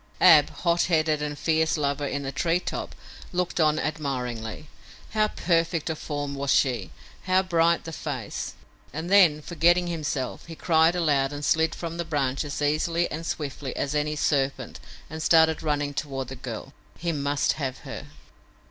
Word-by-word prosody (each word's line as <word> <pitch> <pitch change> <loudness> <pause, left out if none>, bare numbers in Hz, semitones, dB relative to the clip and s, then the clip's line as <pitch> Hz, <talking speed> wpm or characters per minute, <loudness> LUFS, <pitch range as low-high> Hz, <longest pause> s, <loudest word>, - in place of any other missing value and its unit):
Ab, 155 -5 +7
hot 170 -1 +1
headed 155 -3 +1
and 145 -1 -3
fierce 160 0 +1
lover 140 -1 -1
in 140 +1 -3
the 135 - -3
tree 165 +5 +1
top, - - -5 0.4
looked 180 -1 -1
on 155 -1 +3
admiringly. 125 -5 -3 0.4
How 215 0 +2
perfect 165 -4 0
of 155 - -5
form 145 -2 -4
was 140 0 -3
she; 125 -8 +2 0.4
how 185 0 +3
bright 170 -2 +2
the 165 - -7
face! 140 -8 -5 0.4
and 160 +6 -5
then, 170 -7 +6
forgetting 175 +2 +3
himself, 150 -7 -3
he 165 - -8
cried 165 +1 +3
aloud 145 -5 +2
and 145 0 -5
slid 160 +1 +2
from 170 -1 -5
the 170 - -1
branch 140 -4 -1
as 145 0 -4
easily 165 +4 +1
and 165 +2 -5
swiftly 140 -3 -4
as 140 - -2
any 150 0 0
serpent 140 -2 -1 0.3
and 160 0 -7
started 160 -1 +4
running 145 -2 -1
toward 135 -3 -4
the 135 - -6
girl. 125 +1 -7 0.2
He 170 +1 -2
must 145 -1 0
have 130 -2 -2
her! - - -7
155 Hz, 165 wpm, -26 LUFS, 140-165 Hz, 0.4 s, Ab